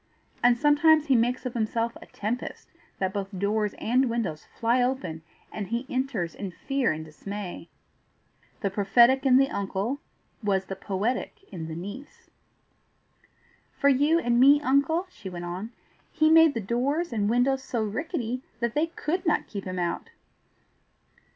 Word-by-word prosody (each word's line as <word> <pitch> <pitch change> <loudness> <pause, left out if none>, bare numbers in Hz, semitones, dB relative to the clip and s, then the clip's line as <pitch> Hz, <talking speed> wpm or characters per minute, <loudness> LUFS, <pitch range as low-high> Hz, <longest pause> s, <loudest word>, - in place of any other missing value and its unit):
And 240 0 +5
sometimes 300 +2 +5
he 275 -4 +3
makes 245 +3 +1
of 250 - -3
himself 230 0 -1
a - - -12
tempest, 225 +5 -5 0.3
that 190 -1 -1
both 195 -1 -3
doors 210 +2 0
and 255 +3 +2
windows 215 -10 -3
fly 235 +2 +2
open, 220 -11 -2 0.3
and 210 -3 -5
he 235 +5 -2
enters 250 -11 -2
in 200 - -5
fear 270 +8 -1
and 155 0 -5
dismay." 180 +2 -7 0.9
The 200 -4 0
prophetic 240 +7 +4
in 255 -1 +6
the 270 +1 +3
uncle 200 +6 -2 0.4
was 195 -2 +1
the 195 - -5
poetic 215 - -3
in 165 -3 -6
the 160 - -6
niece. 200 - -9 1.5
"For 280 - +4
you 290 +4 +4
and 240 -6 +2
me, 280 +3 +7
uncle," 285 +6 +2
she 195 - -9
went 175 -1 -6
on, 180 +5 -5 0.4
"he 310 -1 +3
made 325 -3 +7
the 230 - -1
doors 255 - -1
and 205 -2 +1
windows 265 +3 +2
so 235 -4 -2
rickety 250 - -3 0.2
that 235 -1 -1
they 310 +2 +1
COULD 340 +2 -3
not 315 - +2
keep 200 -3 -7
him 185 -1 -4
out." 175 -1 -2
235 Hz, 155 wpm, -27 LUFS, 200-270 Hz, 1.5 s, me